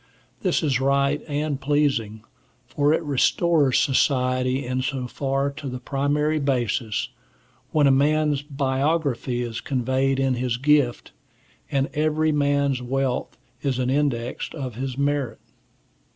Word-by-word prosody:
This 180 -3 +1
is 135 -4 +1
right 140 +1 +2
and 145 -1 -2
pleasing, 135 -7 0 0.4
for 145 +4 +1
it 160 - +1
restores 145 0 +2
society 130 -1 +1
in 130 +1 -1
so 130 -1 -2
far 135 +2 -1
to 140 0 -8
the 125 - -5
primary 145 +4 0
basis, 120 -5 -1 0.6
when 150 -2 +3
a 140 - +5
man's 150 +1 +2
biography 140 -2 -1
is 115 -1 -5
conveyed 130 +1 0
in 135 -1 +2
his 125 -1 -1
gift, 140 -2 +2 0.6
and 135 0 +1
every 155 +1 +1
man's 140 -2 +1
wealth 130 +1 -2 0.2
is 135 -3 -1
an 130 0 0
index 130 -4 -1
of 130 -5 -5
his 130 +2 -4
merit. 140 -4 0
135 Hz, 130 wpm, -24 LUFS, 130-145 Hz, 0.6 s, a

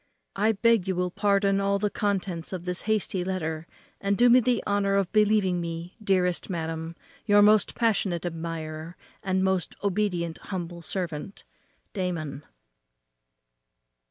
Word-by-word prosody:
I 215 +3 +2
beg 225 -2 +3
you 190 - 0
will 180 0 -1
pardon 200 0 +2
all 200 0 +2
the 205 0 -1
contents 190 -5 -2
of 180 -1 -5
this 180 0 -1
hasty 200 -4 0
letter, 165 -3 -3 0.3
and 200 0 0
do 245 +1 +6
me 250 - +8
the 245 -1 +1
honour 200 -1 +1
of 195 -2 +1
believing 210 -4 +3
me, 170 +1 -5
Dearest 185 -3 +1
madam, 165 -1 -4 0.3
Your 205 0 +6
most 210 0 +4
passionate 200 -7 0
admirer, 165 -1 -5 0.2
and 190 -1 0
most 190 -2 0
obedient 180 -4 -1
humble 175 -3 -6
servant, 170 0 -5 0.5
DAMON." 165 -7 -3
185 Hz, 135 wpm, -27 LUFS, 170-205 Hz, 0.5 s, me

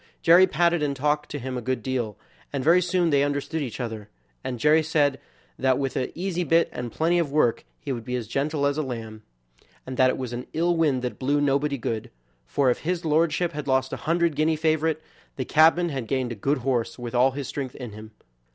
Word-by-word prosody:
Jerry 175 +3 +7
patted 175 -2 +2
and 145 -2 0
talked 150 +2 0
to 145 - -4
him 130 -1 -5
a 125 - -3
good 130 +2 -2
deal, 120 -6 -2 0.3
and 140 -2 -2
very 170 +5 +5
soon 175 -1 +1
they 140 -1 +4
understood 145 +2 -2
each 130 -4 -5
other, 110 -4 -5 0.3
and 125 - -3
Jerry 150 +3 +5
said 145 -4 +1 0.4
that 130 -1 +2
with 135 -2 -2
an 130 - -1
easy 180 0 -2
bit 165 0 +3
and 120 -1 -5
plenty 170 +6 +1
of 160 -5 -1
work 140 -6 +2
he - - -5
would 120 -3 -4
be 125 +1 -3
as 120 -4 -4
gentle 140 +3 -1
as 145 +1 +1
a - - +2
lamb; 115 -5 -6 0.6
and 130 -1 -6
that 130 -1 +5
it - - -1
was 125 -2 -5
an 120 +1 -5
ill 170 +2 +1
wind 145 -6 +1
that 125 - -4
blew 145 +2 +1
nobody 140 0 +1
good, 115 -3 -3 0.4
for 130 - +2
if - - -2
his 175 +1 -2
lordship 160 +2 +2
had 145 -1 -6
lost 130 0 +1
a - - -7
hundred 170 -1 +2
guinea 155 +2 +2
favorite, 155 0 0 0.3
the 130 - -3
cabman 165 +4 +4
had 135 -6 -4
gained 130 0 -1
a - - -4
good 135 +8 0
horse 125 -4 0
with 120 -1 -6
all 125 +2 +3
his 140 -1 -5
strength 135 -3 -5
in 125 -4 -7
him. 110 +1 -10
140 Hz, 225 wpm, -25 LUFS, 125-160 Hz, 0.6 s, Jerry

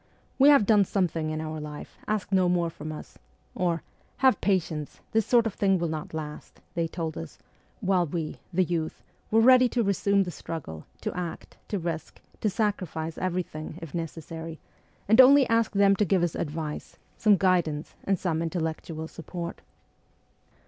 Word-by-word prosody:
' - - -37
"We 275 +2 +8
have 280 -8 +6
done 210 -1 +5
something 170 -5 0
in 155 0 -2
our 155 0 -4
life: 150 -1 -8
ask 215 -2 -1
no 185 -2 +4
more 175 -2 +1
from 155 0 -7
us; 155 - -10 0.2
' - - -39
or, 170 -3 0 0.2
' - - -36
Have 260 -5 +5
patience: 165 -6 -1
this 220 -2 +2
sort 240 -2 +4
of 225 - -1
thing 195 -1 +2
will 170 -1 -1
not 155 0 -4
last,' 150 -1 -7
they 170 -1 0
told 160 -1 -4
us, 80 - -8 0.4
while 185 -2 +2
we, 160 0 -4
the 185 +1 +3
youth, 165 -2 -3 0.3
were 225 +1 +4
ready 255 +1 +7
to 240 -1 +1
resume 200 0 +2
the 180 - -5
struggle, 145 - -7
to - - -3
act, 175 -2 -6
to 205 - -2
risk, 165 -3 -4 0.2
to 215 - +1
sacrifice 185 -6 -2
everything, 170 -4 -3
if 165 -5 -9
necessary, 165 0 -5 0.5
and 220 +5 +8
only 275 +1 +7
asked 230 -2 +2
them 200 0 +5
to - - +3
give 185 -2 +2
us 175 - 0
advice, 155 -1 -4 0.2
some 210 -3 +4
guidance 170 -5 +1
and 195 -1 +1
some 165 -2 -1
intellectual 160 -1 -3
support. 170 +1 -7
175 Hz, 175 wpm, -27 LUFS, 160-200 Hz, 0.5 s, We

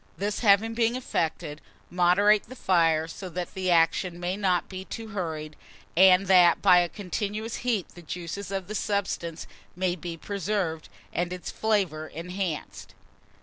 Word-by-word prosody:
This 205 +1 -2
having 220 +1 +4
been 230 +1 +1
effected, 160 -10 -3 0.3
moderate 185 +4 +4
the 255 - -9
fire, 165 -7 +2
so 185 +3 -8
that 175 0 -5
the 185 -1 -2
action 170 +1 +2
may 180 +1 -2
not 185 -4 +1
be 185 -1 -7
too 225 +3 -7
hurried, 160 -6 -4 0.4
and 190 +2 +6
that 180 -2 +6
by 180 -3 +6
a 175 -1 +1
continuous 210 +3 -4
heat 230 -7 -1
the 175 - -13
juices 175 +3 -6
of 195 -2 -3
the 215 - -5
substance 195 -6 -2 0.3
may 180 0 0
be 170 -1 -6
preserved, 195 -4 -3 0.2
and 175 0 -1
its 180 -1 -5
flavour 190 -8 0
enhanced. 180 0 -5
185 Hz, 150 wpm, -27 LUFS, 170-205 Hz, 0.4 s, and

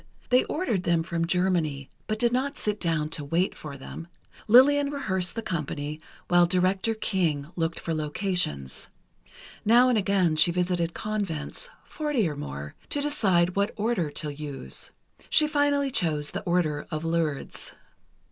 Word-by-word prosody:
They 250 +1 +5
ordered 295 - -1
them 170 -2 +1
from 165 -1 -2
Germany, 170 -7 0 0.2
but 215 - -1
did 235 +1 +2
not 275 +3 -1
sit 210 0 -1
down 160 -3 0
to 155 -2 -2
wait 165 +6 0
for 145 -2 -8
them. 165 +5 -9 0.4
Lillian 280 +5 +6
rehearsed 190 -11 -2
the 230 - -3
company 150 -3 -4 0.3
while 175 0 +5
Director 190 +5 +1
King 170 -8 -1
looked 165 -1 -1
for 165 - -3
locations. 155 - -1 0.8
Now 240 +4 +6
and 240 -3 +3
again 190 -5 +2
she 160 +3 +6
visited 175 -1 0
convents, 205 - -4
forty 295 - -1
or 150 - -3
more, 70 - -6 0.2
to 290 - -2
decide 190 -12 +2
what 200 +1 0
Order 215 -7 0
to 145 0 -4
use. 145 -2 -5 0.4
She 310 - +5
finally 285 -2 +1
chose 155 -9 0
the - - -4
Order 170 -4 0
of 155 +1 -4
Lourdes. 165 -3 -2
180 Hz, 150 wpm, -27 LUFS, 155-215 Hz, 0.8 s, Lillian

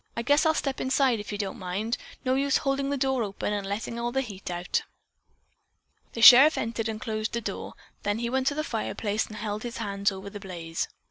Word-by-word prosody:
I 235 - -1
guess 290 +5 +4
I'll 315 - +3
step 275 -3 -2
inside, 260 -3 +2
if 205 - -7
you 205 - -3
don't 200 -2 -4
mind. 200 +6 -2 0.3
No 255 - +2
use 275 +1 +2
holding 275 0 -1
the 285 - 0
door 265 -1 +1
open 205 0 -2
and 200 -1 -3
letting 205 +4 -3
the 240 +3 -1
heat 200 -8 -7
all 175 - -2
out." 175 +1 -1 1.3
The 230 - -4
sheriff 270 +7 +10
entered 225 0 -2
and 215 -1 -4
closed 215 0 -3
the 235 - 0
door, - - -5 0.3
then 205 +1 -1
he 235 +1 -2
went 260 +2 0
to 285 - +2
the 305 - -1
fireplace 220 -3 -2
and 215 - -10
held 210 0 -4
his 240 0 -5
hands 200 -2 0
over 195 +1 -8
the 205 - -7
blaze. 170 -4 -4
225 Hz, 220 wpm, -27 LUFS, 205-265 Hz, 1.3 s, sheriff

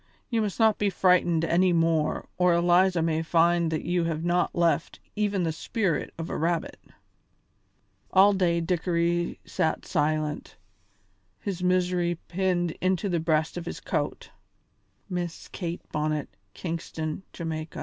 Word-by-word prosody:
You 230 -1 +2
must 210 0 -3
not 220 -2 +4
be 205 - +2
frightened 180 -3 +3
any 180 +2 +3
more 165 -2 +1
or 180 -1 +3
Eliza 175 0 +3
may 160 -1 +1
find 170 +1 +3
that 160 -1 -2
you 175 0 0
have 160 -1 -2
not 175 0 +1
left 170 -1 +1 0.2
even 205 -3 0
the 165 - 0
spirit 175 +1 -1
of 165 0 -4
a - - -4
rabbit." 175 - -1 1.3
All 195 +2 +6
day 175 -3 +1
Dickory 170 0 0
sat 160 - -1
silent, 155 -1 -1 0.8
his 185 - -4
misery 180 -1 +1
pinned 175 -1 0
into 185 +1 +1
the 175 -2 +1
breast 160 +1 0
of 170 -1 -5
his - - -5
coat. - - -3 0.8
"Miss 175 -3 -4
Kate 175 -2 -5
Bonnet, 150 -1 -1 0.3
Kingston, 160 -1 -4 0.2
Ja." 170 - -4
175 Hz, 140 wpm, -27 LUFS, 165-185 Hz, 1.3 s, All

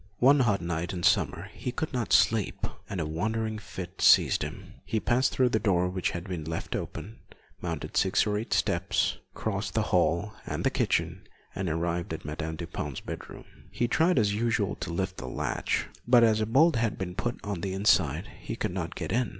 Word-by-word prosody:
One 140 +6 +6
hot 105 -7 +2
night 85 +1 -2
in 90 -1 -4
summer 90 +4 +2
he 125 - -4
could 155 +4 -4
not 120 -3 -2
sleep, 110 -4 +3 0.2
and 95 - -3
a 80 - -1
wandering 110 +7 -2
fit 95 -3 -8
seized - - +6
him. - - -7
He 110 - -1
passed 125 +4 +2
through 125 -2 +2
a 110 - +3
door 90 -4 +2
which 90 -1 -1
had 85 +2 -5
been 90 -4 -4
left 80 +1 -4
open, 110 +3 -6 0.4
mounted 85 -3 -4
six 95 - +3
or 105 -1 0
eight 115 - -7
steps, - - +1 0.2
crossed - - -3
the - - +2
hall 100 +6 +2
and - - -3
the - - +2
kitchen - - 0 0.3
and 95 -2 -2
arrived 85 +1 -1
at - - -11
Madame 80 +1 -4
Dupin's 75 -2 -5
bedroom. - - -8 0.2
He 120 - 0
tried 160 +6 +3
as 105 -4 +3
usual 110 -2 0
to 90 - -5
lift 95 +2 -2
the 65 - -6
latch, - - -1 0.2
but 120 -1 +7
as 110 -1 +4
a 110 - 0
bolt 140 +5 +4
had 115 -2 0
been 90 -2 -4
put 120 +6 -3
on 100 -4 -3
the 95 0 -2
inside, 100 +2 +3
he - - -5
could - - -2
not - - -4
get - - -4
in. 120 0 +1
100 Hz, 200 wpm, -28 LUFS, 85-115 Hz, 0.4 s, but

